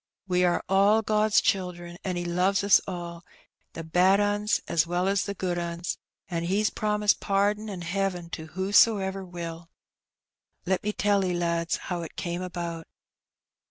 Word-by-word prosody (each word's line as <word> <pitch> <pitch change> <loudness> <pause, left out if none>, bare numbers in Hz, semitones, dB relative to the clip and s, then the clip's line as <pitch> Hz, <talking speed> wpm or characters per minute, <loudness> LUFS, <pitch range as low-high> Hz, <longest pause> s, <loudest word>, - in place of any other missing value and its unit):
We 180 -1 +2
are 175 - +1
all 200 +3 +4
God's 215 0 +3
children, 175 -2 -2
an' 185 -2 -2
He 175 0 -3
loves 185 +3 +1
us 200 -1 +6
all, 170 -2 -6 0.5
the 165 - -6
bad 180 +4 +3
'uns 205 +1 +1
as 165 0 +1
well 175 +2 0
as 200 0 +1
the 200 - -4
good 180 -2 -2
'uns, 170 0 -4 0.3
an' 170 -3 -3
He's 205 +4 +1
promised 210 -1 +1
pardon 205 +2 0
an' 190 -3 -6
heaven 180 -1 -2
to 160 -2 -6
whosoever 195 +2 +2
will. 170 -2 -7 1.0
Let 190 0 0
me 210 - -1
tell 205 -1 +1
'e, 180 -1 0
lads, 170 -1 0
how 175 -2 -4
it 165 - -8
came 175 0 -3
about. 170 -2 -5
185 Hz, 160 wpm, -27 LUFS, 175-200 Hz, 1.0 s, us